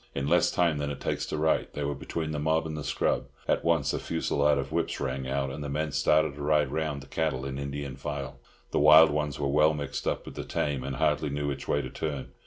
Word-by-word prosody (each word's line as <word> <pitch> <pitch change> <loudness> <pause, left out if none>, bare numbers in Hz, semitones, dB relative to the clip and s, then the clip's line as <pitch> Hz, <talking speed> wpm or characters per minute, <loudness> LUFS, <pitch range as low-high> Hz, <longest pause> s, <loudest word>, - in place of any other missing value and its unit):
In 70 0 -1
less 90 +3 +4
time 85 -4 +1
than 70 0 -2
it 70 - -5
takes - - -2
to - - -3
write, 80 +1 +1
they 75 - -2
were 70 +1 -1
between 80 +3 -4
the 75 - -2
mob 80 +2 +1
and 80 -1 -4
the 75 - -5
scrub; - - 0 0.2
at - - +1
once 80 -5 +2
a - - -1
fusillade 75 -3 +1
of 70 -1 -3
whips - - -1
rang 65 -1 -3
out, 70 0 -1
and 75 +2 -6
the 70 - -4
men 75 +2 -1
started 75 0 +3
to 75 - -9
ride 75 -2 +2
round 75 -2 -2
the - - -14
cattle 70 -3 -1
in 70 0 -4
Indian 70 -1 -4
file. 70 -1 -5 0.3
The - - +1
wild 75 +1 +8
ones 75 -1 -2
were 70 - 0
well 75 +2 +4
mixed 70 -2 -4
up - - -1
with - - -8
the - - -5
tame, 70 -4 -2
and 70 - -4
hardly 75 0 +1
knew 70 +1 -2
which 70 -1 -5
way 70 - +1
to 65 - -5
turn. 70 -5 -4
75 Hz, 255 wpm, -28 LUFS, 70-75 Hz, 0.3 s, wild